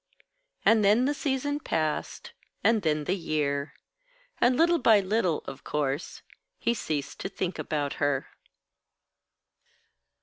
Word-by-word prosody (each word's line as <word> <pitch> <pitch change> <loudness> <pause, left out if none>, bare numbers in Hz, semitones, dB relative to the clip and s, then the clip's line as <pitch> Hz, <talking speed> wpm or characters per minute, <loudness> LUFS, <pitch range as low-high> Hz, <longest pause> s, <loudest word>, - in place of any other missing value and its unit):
And 220 -1 +5
then 210 +5 +4
the 290 - +1
season 285 0 -1
passed, 155 - -2 0.3
and 225 -1 +4
then 155 -3 0
the 180 +6 0
year; 150 -4 -2 0.6
and 245 +1 +3
little 340 +1 +4
by 220 -6 +6
little, 190 -4 0
of 135 - -8
course, 145 +1 -3 0.3
he 235 - +1
ceased 155 -10 -4
to - - -4
think 185 -2 -3
about 145 -2 -2
her. 145 -2 0
185 Hz, 125 wpm, -27 LUFS, 150-235 Hz, 0.6 s, by